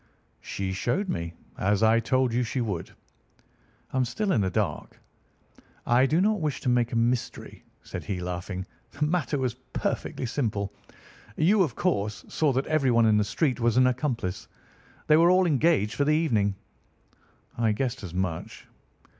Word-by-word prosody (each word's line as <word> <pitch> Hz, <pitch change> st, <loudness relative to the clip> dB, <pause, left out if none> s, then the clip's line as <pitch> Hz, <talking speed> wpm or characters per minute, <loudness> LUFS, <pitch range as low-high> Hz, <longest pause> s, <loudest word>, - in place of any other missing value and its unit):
"She 95 Hz, -1 st, -4 dB
showed 170 Hz, -, -1 dB
me, 85 Hz, -, -3 dB, 0.2 s
as 100 Hz, +2 st, +2 dB
I 110 Hz, +1 st, +5 dB
told 130 Hz, +1 st, +1 dB
you 120 Hz, -, +2 dB
she 125 Hz, +2 st, -2 dB
would." 100 Hz, -8 st, -3 dB, 1.0 s
"I -, -, 0 dB
am 130 Hz, -, +3 dB
still 195 Hz, -, -1 dB
in 115 Hz, -, +2 dB
the 95 Hz, -, +1 dB
dark." 90 Hz, -5 st, -3 dB, 0.9 s
"I 125 Hz, +3 st, +4 dB
do 155 Hz, +5 st, +2 dB
not 210 Hz, 0 st, +2 dB
wish 150 Hz, -3 st, -1 dB
to -, -, 0 dB
make 120 Hz, -1 st, +2 dB
a -, -, -3 dB
mystery," 120 Hz, +1 st, -1 dB, 0.2 s
said -, -, -6 dB
he, 95 Hz, -3 st, -3 dB
laughing. 90 Hz, +1 st, -4 dB, 0.3 s
"The 150 Hz, +1 st, 0 dB
matter 155 Hz, -2 st, 0 dB
was 130 Hz, -3 st, -1 dB, 0.2 s
perfectly -, -, -2 dB
simple. 105 Hz, -6 st, -2 dB, 0.6 s
You, 195 Hz, +6 st, +4 dB
of 145 Hz, -11 st, 0 dB
course, 105 Hz, -, -1 dB
saw 155 Hz, -3 st, +1 dB
that 135 Hz, +2 st, 0 dB
everyone 130 Hz, -7 st, +3 dB
in 110 Hz, -1 st, +4 dB
the 105 Hz, -, +3 dB
street 125 Hz, +6 st, 0 dB
was 120 Hz, 0 st, +2 dB
an 130 Hz, -, +6 dB
accomplice. 125 Hz, -7 st, -1 dB, 0.6 s
They 155 Hz, -, +5 dB
were 170 Hz, +2 st, +6 dB
all 185 Hz, +1 st, +5 dB
engaged 145 Hz, -, +2 dB
for 140 Hz, -, +1 dB
the 150 Hz, +2 st, +3 dB
evening." 110 Hz, -11 st, +1 dB, 1.0 s
"I 115 Hz, -2 st, +1 dB
guessed 125 Hz, +4 st, -2 dB
as 95 Hz, -5 st, -7 dB
much." 90 Hz, -3 st, -3 dB
120 Hz, 170 wpm, -27 LUFS, 105-150 Hz, 1.0 s, an